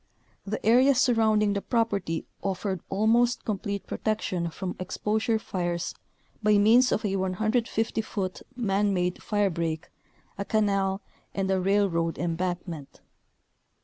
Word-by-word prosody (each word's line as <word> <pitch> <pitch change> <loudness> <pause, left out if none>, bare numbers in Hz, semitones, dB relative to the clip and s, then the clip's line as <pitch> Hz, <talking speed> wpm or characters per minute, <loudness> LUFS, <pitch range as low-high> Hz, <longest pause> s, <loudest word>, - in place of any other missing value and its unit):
The 215 +2 -3
area 255 +5 +6
surrounding 220 -4 +3
the 200 - -1
property 200 -9 -1 0.2
offered 190 -2 -2
almost 230 +5 +2
com 210 -3 -1
plete 200 0 -4
protection 185 -6 -2
from 180 +2 -5
exposure 215 +5 0
fires 175 -4 -3 0.5
by 210 -1 +4
means 230 +5 +5
of 215 - 0
a 195 -1 0
150 220 +4 0
foot, 195 -4 -4
man 205 -4 +1
made 180 0 0
firebreak, 170 -6 -1 0.5
a 200 - -2
canal, 195 -2 +1 0.3
and 195 -1 0
a 190 -1 +2
railroad 185 -4 +1
embankment. 175 -3 -3
200 Hz, 120 wpm, -27 LUFS, 185-220 Hz, 0.5 s, area